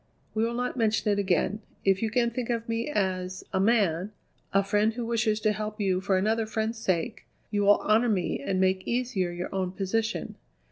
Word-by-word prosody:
"We 220 Hz, -, +1 dB
will 235 Hz, +1 st, -1 dB
not 250 Hz, +1 st, -2 dB
mention 220 Hz, -2 st, +2 dB
it 205 Hz, -, +1 dB
again. 200 Hz, +2 st, +1 dB, 0.2 s
If 195 Hz, -1 st, +3 dB
you 225 Hz, -, +1 dB
can 235 Hz, +1 st, +1 dB
think 240 Hz, 0 st, -4 dB
of 230 Hz, -1 st, -1 dB
me 230 Hz, +3 st, -1 dB
as 185 Hz, -6 st, -1 dB
a 190 Hz, -, +2 dB
man, 195 Hz, -3 st, +2 dB, 0.4 s
a 195 Hz, 0 st, +3 dB
friend 210 Hz, +2 st, +2 dB
who 240 Hz, -1 st, -3 dB
wishes 220 Hz, -2 st, +1 dB
to 215 Hz, -, +3 dB
help 215 Hz, 0 st, -4 dB
you 190 Hz, -2 st, +1 dB
for 190 Hz, -1 st, +2 dB
another 220 Hz, +3 st, +1 dB
friend's 220 Hz, +1 st, -2 dB
sake, 215 Hz, +3 st, -1 dB, 0.2 s
you 205 Hz, -1 st, +1 dB
will 205 Hz, 0 st, +5 dB
honour 225 Hz, +3 st, +3 dB
me 185 Hz, -9 st, 0 dB
and 185 Hz, +7 st, -1 dB
make 185 Hz, 0 st, +1 dB
easier 235 Hz, -7 st, 0 dB
your 175 Hz, +1 st, -5 dB
own 185 Hz, -1 st, -1 dB
position. 220 Hz, +4 st, -2 dB
210 Hz, 200 wpm, -27 LUFS, 190-230 Hz, 0.4 s, will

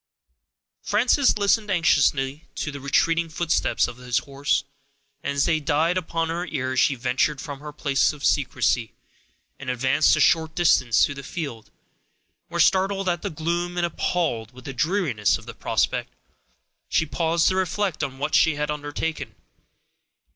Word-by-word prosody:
Frances 245 Hz, +5 st, +2 dB
listened 210 Hz, +1 st, +2 dB
anxiously 140 Hz, -5 st, +1 dB
to 150 Hz, -, -3 dB
the 140 Hz, -, -7 dB
retreating 165 Hz, +4 st, +1 dB
footsteps 160 Hz, +1 st, 0 dB
of 120 Hz, -, -9 dB
his 125 Hz, -1 st, -2 dB
horse, 140 Hz, +2 st, -1 dB, 0.6 s
and, 140 Hz, -, -3 dB
as 140 Hz, -, +2 dB
they 160 Hz, -, +2 dB
died 155 Hz, +3 st, +1 dB
upon 165 Hz, -2 st, -2 dB
her 175 Hz, +2 st, -3 dB
ear, 130 Hz, -4 st, -3 dB
she 140 Hz, +2 st, +3 dB
ventured 130 Hz, +4 st, 0 dB
from 140 Hz, -1 st, -7 dB
her 150 Hz, +1 st, -8 dB
place 140 Hz, -3 st, +1 dB
of 150 Hz, -2 st, -7 dB
secrecy, 125 Hz, -4 st, +1 dB, 0.7 s
and 140 Hz, -, -6 dB
advanced 130 Hz, +6 st, +3 dB
a -, -, -2 dB
short 160 Hz, +2 st, +3 dB
distance 145 Hz, -9 st, +3 dB
into 140 Hz, -, -5 dB
the 140 Hz, -, -8 dB
field, 140 Hz, -6 st, -6 dB, 0.8 s
where, -, -, -5 dB
startled 195 Hz, 0 st, +2 dB
at 175 Hz, -1 st, 0 dB
the -, -, -3 dB
gloom, 170 Hz, +3 st, -2 dB
and 175 Hz, -, +2 dB
appalled 160 Hz, -10 st, -2 dB
with 130 Hz, 0 st, -14 dB
the 135 Hz, -, -5 dB
dreariness 135 Hz, -, +1 dB
of -, -, -15 dB
the -, -, -8 dB
prospect, -, -, -1 dB, 0.8 s
she 160 Hz, -, +2 dB
paused 165 Hz, +1 st, +1 dB
to 185 Hz, -, -1 dB
reflect 190 Hz, -2 st, -1 dB
on 135 Hz, -1 st, -4 dB
what 150 Hz, +3 st, -3 dB
she 160 Hz, -, +4 dB
had 150 Hz, 0 st, -2 dB
undertaken. 145 Hz, -3 st, -4 dB
150 Hz, 160 wpm, -24 LUFS, 135-170 Hz, 0.8 s, she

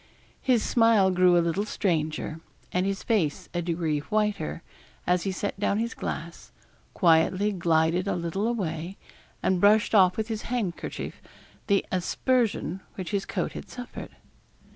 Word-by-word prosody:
His 245 Hz, -4 st, +2 dB
smile 225 Hz, -5 st, +4 dB
grew 180 Hz, -1 st, +5 dB
a 170 Hz, -, +3 dB
little 170 Hz, +4 st, 0 dB
stranger, 160 Hz, -5 st, -1 dB, 0.3 s
and 180 Hz, +2 st, +1 dB
his 195 Hz, -1 st, -2 dB
face 185 Hz, -11 st, 0 dB
a 175 Hz, -, -1 dB
degree 165 Hz, -3 st, -1 dB
whiter, 210 Hz, -1 st, -1 dB, 0.4 s
as 180 Hz, +1 st, +1 dB
he 195 Hz, -, 0 dB
set 195 Hz, +1 st, -4 dB
down 205 Hz, 0 st, +1 dB
his 230 Hz, +1 st, -1 dB
glass, 170 Hz, +2 st, -6 dB, 0.4 s
quietly 180 Hz, +3 st, +3 dB
glided 170 Hz, 0 st, +1 dB
a -, -, 0 dB
little 175 Hz, +5 st, -2 dB
away, 180 Hz, -5 st, -3 dB, 0.5 s
and 185 Hz, -2 st, +2 dB
brushed 210 Hz, +2 st, +4 dB
off 185 Hz, -3 st, +5 dB
with 220 Hz, -1 st, -1 dB
his 220 Hz, -2 st, -3 dB
handkerchief 220 Hz, -9 st, -3 dB, 0.5 s
the 200 Hz, -2 st, +2 dB
aspersion 200 Hz, 0 st, 0 dB, 0.2 s
which 185 Hz, 0 st, -5 dB
his 200 Hz, -1 st, -1 dB
coat -, -, -2 dB
had -, -, -8 dB
suffered. 245 Hz, -1 st, -8 dB
190 Hz, 145 wpm, -27 LUFS, 170-210 Hz, 0.5 s, grew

